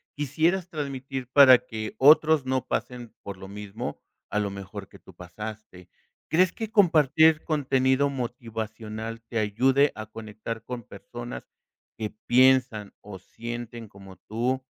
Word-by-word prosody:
quisieras 160 Hz, +6 st, 0 dB
transmitir 135 Hz, -4 st, -5 dB
para 135 Hz, -3 st, +9 dB
que 110 Hz, -1 st, -6 dB
otros 150 Hz, 0 st, +6 dB
no 130 Hz, 0 st, -1 dB
pasen 120 Hz, -2 st, -4 dB
por 100 Hz, -2 st, -7 dB
lo 95 Hz, -, -10 dB
mismo, 105 Hz, +4 st, -6 dB, 0.3 s
a -, -, -2 dB
lo 100 Hz, -1 st, 0 dB
mejor 100 Hz, 0 st, -8 dB
que -, -, -16 dB
tú -, -, -17 dB
pasaste? 95 Hz, 0 st, -9 dB, 0.4 s
¿Crees 180 Hz, +2 st, +3 dB
que 225 Hz, -1 st, -5 dB
compartir 160 Hz, -4 st, +4 dB
contenido 135 Hz, -2 st, +1 dB
motivacional 115 Hz, -2 st, -6 dB
te 115 Hz, 0 st, -3 dB
ayude 130 Hz, +7 st, +3 dB
a 110 Hz, 0 st, -6 dB
conectar 110 Hz, +1 st, -7 dB
con 125 Hz, -2 st, -6 dB
personas 120 Hz, +5 st, -9 dB, 0.5 s
que 110 Hz, -1 st, -4 dB, 0.2 s
piensan 125 Hz, -4 st, +3 dB
o 100 Hz, -2 st, -9 dB
sienten 120 Hz, +3 st, -8 dB
como 95 Hz, -2 st, -14 dB
tú? 125 Hz, +7 st, -2 dB
120 Hz, 135 wpm, -26 LUFS, 110-135 Hz, 0.5 s, para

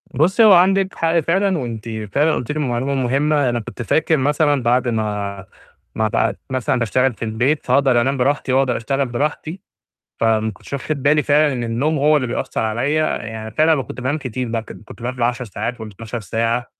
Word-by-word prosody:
بُصّي، 180 Hz, -, +3 dB
هو 215 Hz, -2 st, +8 dB
عندِك 190 Hz, +2 st, +3 dB
حق 165 Hz, +1 st, +1 dB
فعلًا 185 Hz, +3 st, +1 dB
وأنتِ 115 Hz, -4 st, -5 dB, 0.2 s
فعلًا 155 Hz, +2 st, +3 dB
قُلتِ 125 Hz, -, -4 dB
لي 155 Hz, -, -3 dB
معلومة 130 Hz, -1 st, -1 dB
مهمة، 135 Hz, +2 st, +1 dB
أنا 120 Hz, 0 st, -1 dB
كنت 115 Hz, -, -8 dB
فاكر 160 Hz, -, +1 dB
مثلًا 145 Hz, 0 st, +1 dB
بعد 125 Hz, +2 st, +2 dB
ما 105 Hz, -4 st, -3 dB, 0.5 s
ما 110 Hz, -, +1 dB
بقيت 105 Hz, -, 0 dB
مثلًا 130 Hz, -1 st, 0 dB
باشتغل 125 Hz, +3 st, +1 dB
في 115 Hz, -, -6 dB
البيت 120 Hz, +7 st, 0 dB
فاقدر 130 Hz, -1 st, +3 dB
أنام 135 Hz, +3 st, 0 dB
براحتي 135 Hz, 0 st, 0 dB
واقدر 130 Hz, -2 st, +2 dB
أشتغل 135 Hz, +4 st, -1 dB
براحتي، 150 Hz, +7 st, -3 dB, 0.6 s
فما 110 Hz, -1 st, +2 dB
كُنتش 100 Hz, -, -15 dB
واخد 140 Hz, +1 st, -3 dB
بالي 150 Hz, +2 st, +3 dB
فعلًا 145 Hz, +1 st, +3 dB
إن 120 Hz, -2 st, -3 dB
النوم 135 Hz, +7 st, 0 dB
هو 150 Hz, +2 st, +4 dB
اللي 135 Hz, -3 st, 0 dB
بيأثّر 120 Hz, -, -3 dB
عليّا، 130 Hz, +8 st, 0 dB, 0.2 s
يعني 110 Hz, 0 st, -6 dB
فعلًا 155 Hz, +3 st, +2 dB
كنت 125 Hz, -, -9 dB
بانام 130 Hz, +5 st, -1 dB
كتير، 130 Hz, -3 st, -4 dB
م 115 Hz, 0 st, -1 dB
كن 110 Hz, -, -12 dB
كُنت 110 Hz, -, -13 dB
بانام 125 Hz, +1 st, -3 dB
بال10 120 Hz, +1 st, -1 dB
ساعات 115 Hz, +2 st, -5 dB
وال12 110 Hz, +2 st, -7 dB
ساعة، 115 Hz, +5 st, -1 dB
130 Hz, 190 wpm, -19 LUFS, 115-150 Hz, 0.6 s, هو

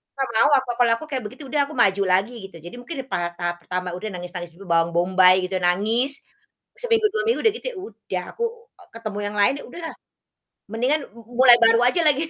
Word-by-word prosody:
Nggak 270 Hz, -2 st, -2 dB
mau 230 Hz, +6 st, +5 dB
aku, 260 Hz, -2 st, 0 dB
kalau 240 Hz, -1 st, +4 dB
aku -, -, -8 dB
kayak 265 Hz, -4 st, -4 dB
begitu 290 Hz, -, -12 dB
udah 285 Hz, +2 st, +1 dB
aku 305 Hz, -, -10 dB
maju 200 Hz, -4 st, +3 dB
lagi 190 Hz, +6 st, +2 dB
gitu. 195 Hz, -, -18 dB
Jadi 175 Hz, -, -9 dB
mungkin 320 Hz, +7 st, -7 dB
pada 175 Hz, -8 st, -2 dB
tahap 175 Hz, 0 st, -2 dB
pertama 180 Hz, 0 st, -4 dB
udah 180 Hz, +5 st, -6 dB
nangis-nangis 175 Hz, -1 st, -7 dB
dulu, 195 Hz, +2 st, -13 dB
bawang 165 Hz, 0 st, +2 dB
bombay 185 Hz, +1 st, +4 dB
gitu, 190 Hz, -, -4 dB
nangis, 220 Hz, +10 st, +1 dB, 0.6 s
seminggu, 455 Hz, -3 st, +2 dB
2 475 Hz, +2 st, -1 dB
minggu 460 Hz, -, +2 dB
udah 445 Hz, -2 st, +4 dB
gitu -, -, -9 dB
ya -, -, -13 dB
udah, 205 Hz, -, -6 dB
aku, 470 Hz, -, -3 dB, 0.4 s
e -, -, -16 dB
ketemu 215 Hz, -3 st, -5 dB
yang 205 Hz, -, -6 dB
lain. 205 Hz, +6 st, +4 dB
Ya, -, -, -9 dB
udah 340 Hz, +8 st, -10 dB
lah, -, -, -15 dB, 0.7 s
mendingan 250 Hz, +8 st, 0 dB
mu 230 Hz, -, -13 dB, 0.2 s
mulai 250 Hz, -2 st, +8 dB
baru 230 Hz, 0 st, +6 dB
aja 295 Hz, +8 st, +3 dB
lagi 300 Hz, +2 st, +3 dB
225 Hz, 220 wpm, -22 LUFS, 185-275 Hz, 0.7 s, mulai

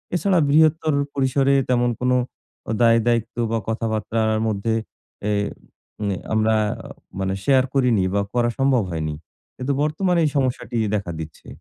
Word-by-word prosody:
এছাড়া 180 Hz, +1 st, +2 dB
বৃহত্তর 155 Hz, +1 st, +4 dB, 0.2 s
পরিসরে 135 Hz, 0 st, +2 dB, 0.2 s
তেমন 120 Hz, -1 st, +2 dB
কোন 125 Hz, 0 st, +1 dB, 0.7 s
দায়-দায়িত্ব 115 Hz, 0 st, +3 dB, 0.2 s
বা 115 Hz, -, +1 dB
কথাবার্তার 110 Hz, 0 st, 0 dB
মধ্যে 110 Hz, +2 st, -1 dB, 0.6 s
এ -, -, +1 dB, 0.8 s
এ -, -, -2 dB, 0.2 s
আমরা 110 Hz, 0 st, +3 dB, 0.6 s
মানে 95 Hz, 0 st, -1 dB
শেয়ার 135 Hz, -2 st, +4 dB
করিনি 125 Hz, -7 st, +3 dB
বা 100 Hz, -, +2 dB
করা 120 Hz, -1 st, +2 dB
সম্ভব 135 Hz, -5 st, +3 dB
হয়নি। 80 Hz, -2 st, -2 dB, 0.4 s
কিন্তু 130 Hz, +2 st, -1 dB
বর্তমানে 175 Hz, +3 st, +1 dB
এই 150 Hz, -, +2 dB
সমস্যাটি 125 Hz, -2 st, -1 dB, 0.2 s
দেখা 100 Hz, -4 st, -3 dB
দিচ্ছে। 80 Hz, -1 st, -9 dB
120 Hz, 130 wpm, -22 LUFS, 110-140 Hz, 0.8 s, বৃহত্তর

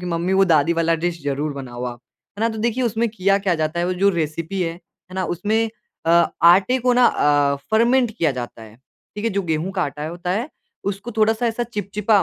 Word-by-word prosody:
कि 180 Hz, -, -6 dB
मम्मी 170 Hz, +2 st, -1 dB
वो 195 Hz, 0 st, +5 dB
दादी 165 Hz, -2 st, +3 dB
वाला 165 Hz, 0 st, +1 dB
डिश 170 Hz, -3 st, -2 dB
ज़रूर 145 Hz, +1 st, -2 dB
बनाओ 125 Hz, -3 st, -7 dB
आप। 120 Hz, -1 st, -6 dB, 0.4 s
है -, -, -5 dB
ना 230 Hz, -, +3 dB
तो 220 Hz, -1 st, -5 dB
देखिए 235 Hz, +3 st, 0 dB
उसमें 230 Hz, +1 st, 0 dB
किया 195 Hz, -2 st, +1 dB
क्या 195 Hz, -3 st, 0 dB
जाता 155 Hz, +1 st, -2 dB
है 175 Hz, -, 0 dB
वो 185 Hz, -, 0 dB
जो 200 Hz, +2 st, +3 dB
रेसिपी 165 Hz, +2 st, -3 dB
है, 165 Hz, -1 st, -1 dB
है 175 Hz, +1 st, -19 dB
ना 185 Hz, -1 st, -1 dB
उसमें 215 Hz, +6 st, 0 dB, 0.4 s
अ, -, -, +3 dB, 0.3 s
आटे 190 Hz, +9 st, +5 dB
को 250 Hz, 0 st, +2 dB
ना 245 Hz, 0 st, +4 dB
अ, 145 Hz, -1 st, +2 dB
फर्मेंट 235 Hz, +2 st, +3 dB
किया 165 Hz, -7 st, 0 dB
जाता 120 Hz, -2 st, -7 dB
है, 110 Hz, 0 st, -13 dB, 0.4 s
ठीक 210 Hz, +2 st, -5 dB
है? 230 Hz, -, +1 dB
जो 200 Hz, -1 st, -1 dB
गेंहू 165 Hz, +1 st, -1 dB
का 190 Hz, -2 st, -1 dB
आटा 150 Hz, +1 st, -4 dB
होता 175 Hz, +2 st, -5 dB
है, 225 Hz, +10 st, -1 dB, 0.4 s
उसको 200 Hz, +4 st, -4 dB
थोड़ा-सा 220 Hz, +2 st, +2 dB
ऐसा 230 Hz, +1 st, -1 dB
चिपचिपा 210 Hz, -2 st, 0 dB
185 Hz, 225 wpm, -21 LUFS, 160-220 Hz, 0.4 s, वो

